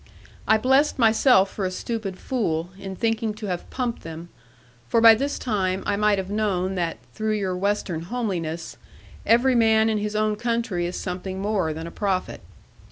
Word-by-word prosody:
I 220 - +5
blessed 265 +6 +3
myself 225 -3 +4
for 200 - -4
a 185 - 0
stupid 195 0 -4
fool, 175 -10 -2
in 195 -1 -6
thinking 225 +1 -1
to 215 0 -7
have 180 -3 -4
pumped 245 -3 -3
them; 165 +1 -8 0.6
for 230 - +2
by 225 0 +9
this 280 +6 -1
time 190 -5 -1
I 205 - +1
might 210 0 +2
have 190 0 -4
known 195 -3 0
that, 170 -3 -2 0.2
through 215 0 -1
your 190 -3 -1
Western 190 -3 -1
homeliness, 170 -6 -4 0.5
every 245 +3 +4
man 220 -2 +4
in 215 -1 0
his 210 0 -3
own 215 0 +1
country 230 -6 -1
is 175 - -5
something 185 +1 -5
more 195 -5 0
than 160 +1 -6
a 170 - -7
prophet. 190 -2 -2
205 Hz, 175 wpm, -24 LUFS, 185-225 Hz, 0.6 s, by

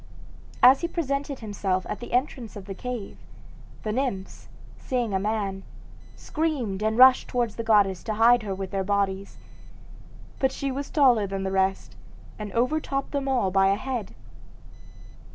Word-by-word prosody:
As 260 +2 +8
he 340 - 0
presented 280 -5 -3
himself 195 -3 -2
at - - -4
the 240 - -9
entrance 250 -2 -1
of 200 -2 -8
the 195 - -6
cave, 240 +1 -6 0.7
the 215 - -2
nymphs, 220 -6 -3 0.3
seeing 245 -6 -2
a 190 - +1
man, 200 -2 -2 0.5
screamed 275 -11 -2
and 220 +1 0
rushed 260 0 +7
towards 240 -4 -1
the 230 - -4
goddess 205 -4 +3
to 215 - -2
hide 235 +2 +5
her 200 -3 -4
with 190 -1 -6
their 195 -1 -1
bodies. 195 0 -1 1.0
But 265 0 +2
she 275 0 -3
was 280 +2 -4
taller 245 -8 +4
than 195 0 -4
the 190 - -2
rest 190 0 0 0.4
and 210 -1 -5
overtopped 275 +2 -1
them 280 -1 -2
all 245 -8 +1
by 195 0 +4
a 195 - +3
head. 240 -2 -5
220 Hz, 160 wpm, -25 LUFS, 195-260 Hz, 1.0 s, As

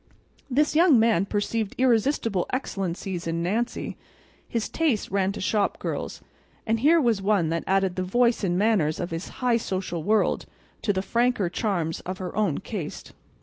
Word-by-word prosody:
This 295 +4 +2
young 325 -4 +6
man 220 -4 +3
perceived 210 0 -1
irresistible 230 -5 +2
excellencies 190 -7 -3
in 165 0 -1
Nancy. 225 +7 -2 0.5
His 230 -2 -1
taste 295 - 0
ran 195 -1 +1
to - - -7
shop 205 +1 0
girls; - - -4 0.4
and 225 0 +1
here 315 +7 +5
was 230 -8 +2
one 195 -5 +2
that 165 0 -1
added 190 -1 +2
the 185 - -1
voice 235 +5 +2
and 175 -2 +1
manners 195 -7 +2
of 175 - -3
his 165 +3 -4 0.2
high 240 -2 +4
social 185 -6 -3
world 215 +6 +1 0.3
to 205 - +1
the 190 -1 -1
franker 235 -4 +1
charms 175 -6 -1
of 185 +1 -5
her 185 0 -6
own 205 -8 +1
caste. 190 -9 -6
205 Hz, 165 wpm, -25 LUFS, 185-235 Hz, 0.5 s, young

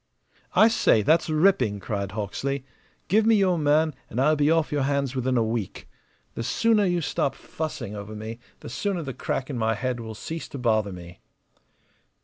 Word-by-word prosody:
"I 220 - +7
say, 220 - +3
that's 160 +6 +3
ripping!" 155 - +3
cried 100 0 -4
Hawksley. 130 +6 -3 0.4
"Give 215 +3 +4
me 225 +1 +5
your 185 -4 +3
man, 155 +1 +3 0.2
and 115 - -3
I'll 150 +4 +4
be 145 0 +2
off 165 -1 +2
your 145 -1 0
hands 140 -1 0
within 130 0 0
a 115 - +3
week. 110 -3 -3 0.5
The - - -5
sooner 215 - +2
you 175 -2 +1
stop 140 - -1
fussing 130 -9 -5
over 105 +1 -7
me 110 +2 -7 0.2
the - - -8
sooner 180 - -2
the 135 -3 -5
crack 130 +3 -3
in 125 - -3
my 110 0 +1
head 125 +2 -2
will 110 -1 -7
cease 160 +9 -6
to - - -8
bother 110 -5 +1
me. 90 -1 -10
135 Hz, 185 wpm, -25 LUFS, 110-160 Hz, 0.5 s, I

